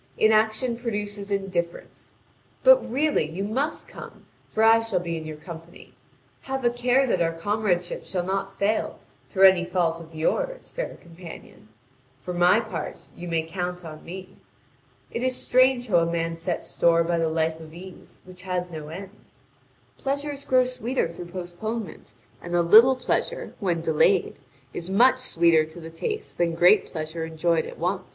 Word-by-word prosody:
Inaction 220 +3 +2
produces 205 -3 -4
indifference. 185 -4 -4 0.5
But, - - +8
really, 285 - +1
you 180 +5 -4
must 265 +9 -2
come, - - -11 0.2
for 220 - 0
I 225 0 +7
shall 225 -5 -1
be 170 -1 -4
in 160 -1 -6
your 155 -1 -7
company. 165 +1 -11 0.5
Have 265 -1 -4
a 240 - +4
care 245 +2 +2
that 185 -8 0
our 165 -1 +2
comradeship 180 0 -1
shall 180 -2 -2
not 195 +1 -3
fail 210 +2 0 0.3
through 195 -2 +1
any 185 -2 +4
fault 175 -2 0
of 165 -1 -13
yours, - - -1
fair - - -4
companion; 170 - -13 0.5
for 180 +7 -6
my 175 +4 +4
part, 220 -1 -6
you 175 - -8
may 165 -1 0
count 180 +1 -5
on 155 -1 -9
me. 185 +2 -9 0.7
It 235 - -3
is 255 0 +1
strange 255 -1 +3
how 185 -5 +3
a 170 0 0
man 165 0 -1
sets 165 +1 -3
store 170 0 +3
by 170 0 0
the 165 -1 +1
life 160 0 0
of 160 -1 -11
ease 180 +2 -12
which 180 0 -12
has 180 -1 -3
no 155 -2 -7
end. 195 +5 -10 0.7
Pleasures 285 +1 -3
grow 255 -1 +4
sweeter 250 -3 -1
through 170 +1 -8
postponement; 190 +5 -6 0.3
and 175 0 -4
a 175 - +3
little 225 +9 +7
pleasure, 255 - -2
when 175 -6 0
delayed, 165 +4 +2 0.3
is 175 +1 -5
much 250 +6 +5
sweeter 170 -9 +3
to 160 +2 -11
the 165 0 -9
taste 425 - -5
than 170 -1 +1
great 180 +5 +5
pleasure 160 0 -5
enjoyed 160 0 0
at - - -10
once. 185 +3 -1
180 Hz, 170 wpm, -25 LUFS, 170-225 Hz, 0.7 s, But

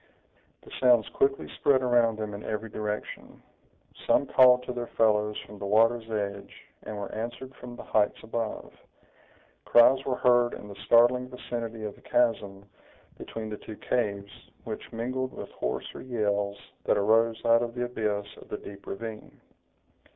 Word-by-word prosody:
The - - -15
sounds 120 -3 +5
quickly 410 0 +1
spread 130 -2 +3
around 120 -3 +3
them 105 -1 -4
in 100 - -7
every 110 0 -4
direction. 105 0 -5 0.7
Some - - +4
called 125 -2 +6
to 125 - -5
their 120 -1 -4
fellows 105 -1 +3
from 105 0 -12
the 100 - -4
water's 115 +2 +3
edge, 100 -2 -3 0.3
and 110 - -7
were 100 -1 -5
answered 120 +4 -5
from 120 -1 -9
the - - -9
heights 105 -1 +1
above. 115 0 -4 0.9
Cries 130 +3 +6
were 130 - -1
heard 120 -1 +3
in - - -10
the 100 - -9
startling 125 +2 +5
vicinity 115 -3 -5
of 105 -1 -4
the - - -20
chasm 100 -5 0 0.5
between 110 -1 -6
the 105 - -4
two 110 - -9
caves, 100 -4 -3
which - - -7
mingled 130 +3 -3
with - - -8
hoarser 60 - -4
yells 105 -4 -1 0.3
that - - +3
arose 110 +2 +3
out 115 0 +5
of 120 0 -3
the 125 0 -1
abyss 105 -4 -2
of - - -14
the - - -3
deep 100 0 -11
ravine. 110 +1 -7
115 Hz, 160 wpm, -28 LUFS, 105-120 Hz, 0.9 s, called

